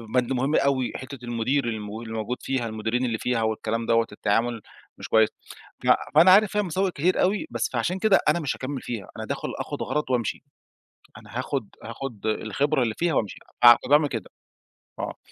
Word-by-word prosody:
بند 125 +1 +2
مهم 135 +4 0
أوي 135 -3 +2
حتّة 130 0 -7
المدير 120 +4 0
ال - - 0
اللي 110 +1 -6
موجود 115 +3 -3
فيها، 130 -3 -2
المديرين 110 +3 -1
اللي 115 -2 -1
فيها، 125 0 -1
والكلام 110 +1 -1
دوّة، 115 0 +2
التعامل 115 +2 0 0.4
مش - - -8
كويس. 110 -1 +5 0.5
ف - - -3 0.3
فأنا 170 +4 +8
عارف 205 +1 +6
فيها 210 - +1
مساوئ 190 +1 -1
كتير 175 +4 +1
أوي، 195 +3 +1
بس 120 -1 -1
فعلشان 170 +11 -1
كده 210 -2 +4
أنا 160 +3 +2
مش 150 -5 -2
هاكمل 135 0 -5
فيها. 110 -6 -6
أنا - - -5
داخل - - -4
آخد - - -5
غرض 150 -2 -2
وأمشي، 120 -4 -1 0.8
أنا 120 - -8
هاخد 130 -4 -3 0.2
هاخد 115 -1 -6
الخبرة 130 +7 0
اللي 115 -2 0
فيها 170 -2 +1
وأمشي 105 -6 -1 0.2
فاع 120 -1 +10
فباعمل 145 +2 +4
كده، 115 -8 -5 0.7
آه. - - -4
125 Hz, 185 wpm, -25 LUFS, 115-145 Hz, 0.8 s, فاع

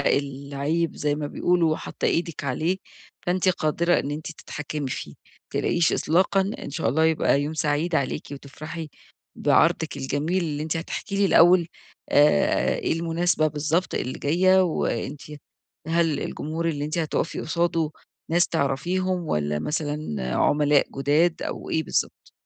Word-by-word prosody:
العيب 140 +4 -1
زي 150 -1 0
ما 150 0 -3
بيقولوا 170 +1 +2
وحاطّة - - -5
إيدِك 165 -3 -1
عليه 155 +7 0 0.5
فأنتِ 185 +1 +1
قادرة 170 0 +2
إن 140 - -4
أنتِ 155 +2 -5
تتحكمي 150 -2 -5
فيه. - - -5 0.4
ما - - +1
تقلقيش 170 -2 +2
إطلاقًا، 185 +4 +2 0.2
إن - - -7
شاء 135 - -1
الله 155 +7 +2
يبقى 160 -3 +3
يوم 150 +2 -3
سعيد 155 +3 0
عليكِ 140 -4 -1
وتفرحي 155 +3 -7 0.5
بعرضِك - - +2
الجميل، 145 +7 -1
اللي 150 -2 -3
أنتِ 160 +1 -2
هتحكي 180 +4 -4
لي 200 - +3
الأول 175 -1 +6 0.4
آآ، 145 - +4
إيه - - 0
المناسبة 165 0 +1
بالضبط 155 +4 -1
اللي 130 - -3
جاية، 185 +5 +4
وأنتِ 145 -4 -2 0.7
هل 165 -2 +1
الجمهور 165 +2 -3
اللي 145 -3 -2
أنتِ 155 +3 -3
هتقفي 160 0 -1
قصاده 165 -1 0 0.4
ناس 175 +2 +3
تعرفيهم 175 +5 -1
والّا 75 - 0
مثلًا 145 - -3
عملاء 145 -1 +3
جداد 155 +5 +2
أو - - -5
إيه 160 - +1
بالضبط؟ - - -2
155 Hz, 140 wpm, -24 LUFS, 145-170 Hz, 0.7 s, الأول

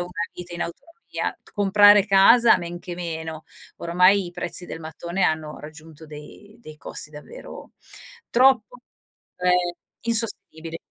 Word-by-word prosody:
una 175 0 -5 0.2
vita 175 -1 -9
in 170 - -3
autonomia. 330 - -8 0.6
Comprare 205 0 +5
casa 210 +4 +6
men 175 0 -6
che 175 0 -7
meno. 160 -2 -6 0.3
Ormai 180 +3 +3
i - - -8
prezzi 175 +1 -3
del 165 - -8
mattone 170 +3 -5
hanno 155 -3 -1
raggiunto 155 +1 -12
dei 155 +9 -13
dei 155 -7 -12
costi 150 - -5
davvero 150 - -11 0.6
troppo 250 -2 +3 0.6
ehm, 180 0 +1 0.5
insostenibili. 205 -8 -3
175 Hz, 125 wpm, -23 LUFS, 160-205 Hz, 0.6 s, casa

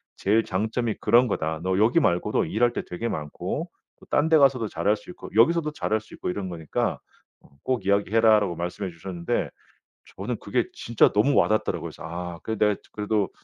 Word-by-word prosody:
제일 110 +3 +2
장점이 110 +4 -1
그런 120 +2 +4
거다. 80 -6 -2
너 95 0 0
여기 115 +10 +4
말고도 90 - +1
일할 120 +3 +1
때 - - -2
되게 90 +7 -3
많고 75 -9 -4 0.3
또 - - -17
딴 150 +2 +2
데 160 - +6
가서도 135 -5 +3
잘할 105 +1 +1
수 110 - -15
있고 - - -10
여기 115 +10 +6
서도 160 -3 -1
잘할 110 -6 -1
수 110 - -17
있고 - - -4
이런 95 +1 -3
거니까 80 -3 -2 0.4
어 - - -22
꼭 130 -5 -1
이야기 100 +1 +1
해라."라고 110 -5 +4
말씀해 90 +3 -4
주셨는데 85 0 -3 0.7
저는 - - -3
그게 - - 0
진짜 115 -1 +2
너무 110 +8 +3
와닿더라고요. 110 0 +2
그래서 - - -12
아 85 0 -6
그래도 110 -1 -3
내가 105 -1 +2 0.2
그래도 105 -1 -1
105 Hz, 395 characters per minute, -25 LUFS, 90-115 Hz, 0.7 s, 데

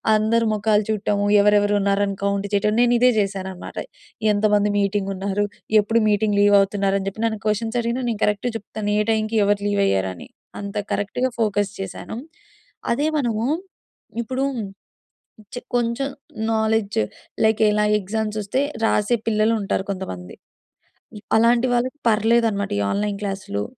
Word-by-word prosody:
అందరి 225 +2 +2
ముఖాలు 210 0 +2
చూడటము 205 -1 0 0.2
ఎవరెవరున్నారని 205 -1 +2
కౌంట్ 200 0 0
చేయటం, 210 +1 +2
నేనిదే 245 +1 +4
చేశాననమాట. 190 -2 -4 0.6
ఎంతమంది 210 0 +2
మీటింగున్నారు? 200 0 -1 0.3
ఎప్పుడు 225 +3 +2
మీటింగ్ 205 0 +1
లీవవుతున్నారని 200 -1 +3
చెప్పి 205 +3 -4
నన్ను 220 -2 -1
క్వెషన్స్ 225 +2 0
అడిగినా 235 +2 -2
నేను 225 -3 -3
కరెక్ట్‌గా 210 +4 0
చెప్తాను 210 0 -5
ఏ - - +3
టైంకి 220 0 0
ఎవరు 205 0 +1
లీవయ్యారని. 95 - 0 0.3
అంత 200 +1 -7 0.2
కరెక్ట్‌గా 250 +5 -1
ఫోకస్ 205 -2 +1
చేశాను. 195 +3 -6 0.8
అదే 290 +5 0
మనము 230 -5 0 0.8
ఇప్పుడు 260 +3 -2 1.1
చే - - -3 0.2
కొంచెం 240 +3 0 0.5
నాలెడ్జ్ 220 - +1 0.4
లైక్ 220 0 +3
ఇలా 210 0 +2
ఎగ్జామ్స్ 215 +2 -3
వస్తే 210 +7 -1 0.3
రాసే 210 +3 +2
పిల్లలు 215 +1 +2
ఉంటారు 190 -1 -1
కొంతమంది. 90 - -7 0.8
ఇ - - -8 0.2
అలాంటి 235 +2 +4
వాళ్ళకి 255 +4 -1
పర్లేదన్నమాట 220 -1 +2
ఈ - - +1
ఆన్‌లైన్ 205 0 -1
క్లాస్‌లు. 195 - -3
210 Hz, 125 wpm, -22 LUFS, 200-225 Hz, 1.1 s, నేనిదే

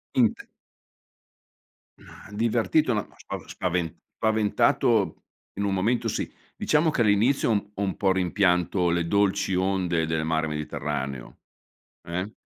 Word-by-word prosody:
Int 120 -5 +2 1.5
Mah, - - -14
divertito 115 +5 +1
no. 105 - -1
Ma - - -23
spa - - -6
spavent 90 -3 -2 0.2
spaventato, 110 -1 +2 0.3
in 100 - -1
un 100 -1 0
momento 110 +6 +1
sì. - - -2 0.2
Diciamo 155 +1 +2
che 130 - 0
all'inizio 115 +4 +3 0.2
ho 100 - -5
un 95 - -1
po' 95 -2 +2
rimpianto 90 -1 +1
le 85 0 0
dolci 100 0 +1
onde 90 -3 +1
del 80 -1 -1
mare 80 0 0
Mediterraneo, 70 -3 -4 0.6
eh, 90 +5 -4
95 Hz, 125 wpm, -26 LUFS, 85-110 Hz, 1.5 s, all'inizio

